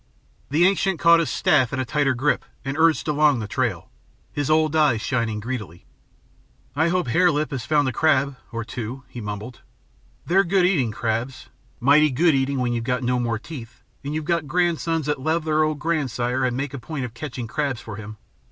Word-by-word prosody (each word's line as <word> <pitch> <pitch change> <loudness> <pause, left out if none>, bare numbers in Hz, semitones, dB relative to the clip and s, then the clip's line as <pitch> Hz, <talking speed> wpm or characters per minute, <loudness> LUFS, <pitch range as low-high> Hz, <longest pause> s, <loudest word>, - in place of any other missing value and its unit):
The 155 +5 +3
ancient 190 -1 +2
caught 170 +1 +6
his 165 - 0
staff 150 -10 +2
in 135 - -2
a 130 - -1
tighter 135 +1 +1
grip 145 +5 +1 0.2
and 135 +1 -2
urged 160 0 +3
along 150 -2 +3
the 110 -3 -4
trail, - - -2 0.4
his 145 -1 -2
old 155 0 +3
eyes 150 -8 +3
shining 115 -3 -1
greedily. 105 -7 -6 0.9
"I 160 +3 +2
hope 175 -6 0
Hare 180 +9 +4
Lip 150 -2 -1
's 130 - -4
found 145 -3 +2
a - - 0
crab... 140 0 +2 0.2
or 115 0 -3
two," 120 +3 -6
he 120 - -8
mumbled. 105 +4 -6 0.6
"They're 190 +3 +4
good 185 0 +2
eating, 155 -11 +2
crabs, 115 +4 -3 0.3
mighty 145 +4 +5
good 160 +5 +3
eating 135 0 0
when 125 -2 0
you've 120 +2 -1
no 125 0 +1
more 115 -2 -1
teeth 120 -2 -10 0.2
and 145 +2 -4
you've 155 -1 -3
got 170 -2 0
grandsons 165 -1 0
that 145 -2 -1
love 160 +3 0
their 155 0 +2
old 155 -1 +1
grandsire 130 -5 -1
and 125 -1 -1
make 140 0 -3
a 140 - -5
point 140 +1 -5
of 115 - -8
catching 125 -1 -6
crabs 135 0 -2
for 105 -4 -8
him. 110 0 -9
140 Hz, 200 wpm, -23 LUFS, 120-155 Hz, 0.9 s, caught